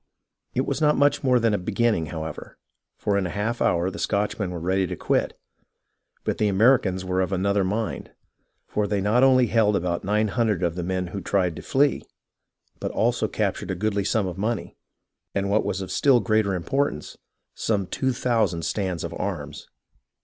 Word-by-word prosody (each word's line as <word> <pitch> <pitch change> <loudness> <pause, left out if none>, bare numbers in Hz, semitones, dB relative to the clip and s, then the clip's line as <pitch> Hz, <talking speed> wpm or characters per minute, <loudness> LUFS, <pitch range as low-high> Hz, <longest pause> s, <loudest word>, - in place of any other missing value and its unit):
It - - +1
was - - -2
not 150 -1 +4
much 145 +1 +3
more 125 -2 +4
than 115 -2 +2
a 105 - +1
beginning, 105 -3 0
however, 80 -1 -7 0.4
for 100 -1 0
in 95 - -1
a - - -5
half 110 +5 -2
hour 85 +2 +2
the - - -8
Scotchmen 100 -1 -1
were 90 -1 -5
ready 95 +2 0
to - - -4
quit; - - 0 0.9
but - - -2
the 105 - +3
Americans 100 -3 +3
were 95 0 0
of 95 0 -1
another 100 +1 +1
mind, 105 +4 -2 0.6
for 105 -1 -1
they 100 0 0
not 105 +5 +2
only 130 -1 +5
held 110 -3 +2
about 85 -2 -1
nine 105 +2 +1
hun 115 +2 +1
dred 100 -5 0
of 85 -2 +1
the 90 - -4
men 90 +1 -2
who 100 - -4
tried 90 -2 0
to - - -6
flee, 140 +2 +2 0.8
but - - -3
also - - +1
captured - - -2
a 95 - -1
goodly 100 +1 0
sum 105 +1 +1
of 90 0 -5
money, 110 +2 -2 0.6
and 100 0 0
what 110 - +3
was 95 - -2
of 95 -1 -6
still 135 -4 +4
greater 110 -4 +1
importance, 90 - -2 0.3
some 105 -3 -1
two 130 +8 -1
thousand 110 -10 0
stands 90 -1 -2
of - - -5
arms. - - -5
100 Hz, 190 wpm, -24 LUFS, 90-115 Hz, 0.9 s, only